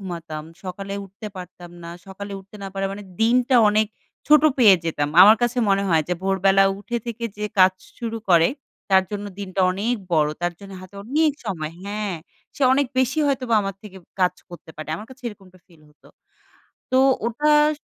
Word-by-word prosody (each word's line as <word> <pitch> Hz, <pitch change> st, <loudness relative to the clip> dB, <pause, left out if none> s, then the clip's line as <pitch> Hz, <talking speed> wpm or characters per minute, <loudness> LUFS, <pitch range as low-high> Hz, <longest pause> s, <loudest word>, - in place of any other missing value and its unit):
ঘুমাতাম, 165 Hz, -5 st, -6 dB, 0.2 s
সকালে 195 Hz, +2 st, -6 dB
উঠতে 195 Hz, +3 st, -11 dB
পারতাম 180 Hz, -1 st, -10 dB
না, 170 Hz, -, -8 dB, 0.2 s
সকালে 200 Hz, +1 st, -8 dB
উঠতে 195 Hz, +2 st, -15 dB
না -, -, -5 dB
পারা 195 Hz, 0 st, -1 dB
মানে 205 Hz, -, -8 dB, 0.2 s
দিনটা 245 Hz, +3 st, +3 dB
অনেক 215 Hz, +1 st, +2 dB, 0.4 s
ছোট 300 Hz, 0 st, +6 dB, 0.2 s
পেয়ে 215 Hz, -6 st, +8 dB
যেতাম। 150 Hz, -3 st, -1 dB
আমার 215 Hz, +3 st, +8 dB
কাছে 240 Hz, +1 st, 0 dB
মনে 195 Hz, 0 st, +2 dB
হয় 165 Hz, -3 st, +3 dB
যে 180 Hz, -, 0 dB
ভোরবেলা 195 Hz, 0 st, +3 dB
উঠে 235 Hz, +4 st, -4 dB
থেকে 235 Hz, 0 st, -5 dB
যে 210 Hz, -, -4 dB
কাজ 185 Hz, 0 st, +7 dB, 0.3 s
শুরু 230 Hz, -2 st, -4 dB
করে 170 Hz, -2 st, +5 dB, 0.4 s
তার 190 Hz, 0 st, +6 dB
জন্য 205 Hz, -1 st, -4 dB
দিনটা 195 Hz, -1 st, -4 dB
অনেক 210 Hz, +6 st, -1 dB, 0.2 s
বড়। 150 Hz, -2 st, +3 dB
তার 175 Hz, -, 0 dB
জন্য 200 Hz, -1 st, -11 dB
হাতে 185 Hz, +1 st, -14 dB
অনেক 300 Hz, +6 st, +2 dB
সময় 160 Hz, -7 st, -4 dB
হ্যাঁ। 205 Hz, -1 st, -3 dB, 0.4 s
সে 285 Hz, -, -4 dB
অনেক 280 Hz, 0 st, +2 dB
বেশি 260 Hz, +4 st, +1 dB
হয়তোবা 255 Hz, -4 st, 0 dB
আমার 195 Hz, -1 st, -4 dB
থেকে 205 Hz, -3 st, -11 dB, 0.2 s
কাজ 180 Hz, 0 st, +3 dB, 0.2 s
করতে 175 Hz, -2 st, -12 dB
পারে। 155 Hz, 0 st, -8 dB
আমার 210 Hz, +5 st, -9 dB
কাছে 260 Hz, 0 st, -15 dB
এরকমটা 190 Hz, -4 st, -15 dB
ফিল 165 Hz, -4 st, -22 dB
হতো। 150 Hz, -, -23 dB, 0.8 s
তো 260 Hz, -, +3 dB, 0.3 s
ওটা 295 Hz, +6 st, +1 dB, 0.3 s
স -, -, -32 dB
195 Hz, 185 wpm, -22 LUFS, 185-230 Hz, 0.8 s, পেয়ে